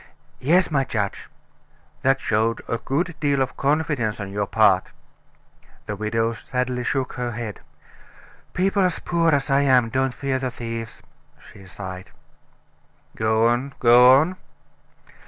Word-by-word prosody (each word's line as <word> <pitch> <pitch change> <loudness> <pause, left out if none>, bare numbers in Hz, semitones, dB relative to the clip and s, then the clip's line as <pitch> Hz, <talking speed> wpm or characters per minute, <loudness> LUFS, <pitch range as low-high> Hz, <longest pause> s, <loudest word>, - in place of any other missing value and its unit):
"Yes, 170 +7 +2
my 140 -3 +2
judge." 105 -5 -4 0.7
"That 135 0 +2
showed 115 0 0
a 115 - -2
great 165 +5 -2
deal 145 -2 +1
of 130 -1 -1
confidence 140 -7 0
on 100 -2 -6
your 100 0 -2
part." - - +3 1.0
The 105 - -4
widow 115 +2 -1
sadly 125 +1 -3
shook 130 +1 -2
her 120 -1 -4
head. 110 -2 -6 0.9
"People 195 +2 +1
as 180 -3 +1
poor 170 -1 0
as 145 -2 +1
I 135 +1 +4
am 130 -4 +3
don't 130 +1 -1
fear 135 -1 -2
the 130 -1 -2
thieves," 115 -2 -7 0.4
she 95 -1 -15
sighed. 95 0 -8 1.1
"Go 110 +1 +2
on 125 +4 -1
go 125 +1 +7
on." 175 +5 -1
125 Hz, 135 wpm, -23 LUFS, 115-140 Hz, 1.1 s, go